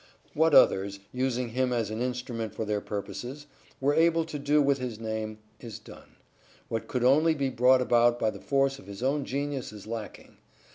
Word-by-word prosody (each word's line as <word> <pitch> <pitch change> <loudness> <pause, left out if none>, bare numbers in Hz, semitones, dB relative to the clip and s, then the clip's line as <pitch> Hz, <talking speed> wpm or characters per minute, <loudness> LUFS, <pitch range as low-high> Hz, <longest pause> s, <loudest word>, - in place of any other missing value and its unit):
What 160 0 +3
others, 100 +1 +4
using 125 -1 -1
him 125 +2 0
as 115 -4 -1
an 110 +2 -4
instrument 120 -3 -4
of 110 - -2
their 105 -1 -1
purposes, 105 +9 -6 0.3
were 140 +2 +2
able 165 +1 +3
to 150 -2 -6
do 145 +2 +2
with 140 -1 +2
his 120 -4 -5
name, 110 -1 -4 0.2
is 115 -4 -8
done; - - -15 0.5
what 115 -1 -3
could 125 -2 -2
only 155 +6 +4
be 135 -2 -1
brought 125 +1 +4
about 120 0 +3
by 110 - +1
the - - -11
force 135 -1 +1
of 95 - -15
his 100 +4 -8
own 140 +1 0
genius 140 -2 -3
is 105 -2 -11
lacking. 110 -1 -8
125 Hz, 190 wpm, -28 LUFS, 110-140 Hz, 0.5 s, others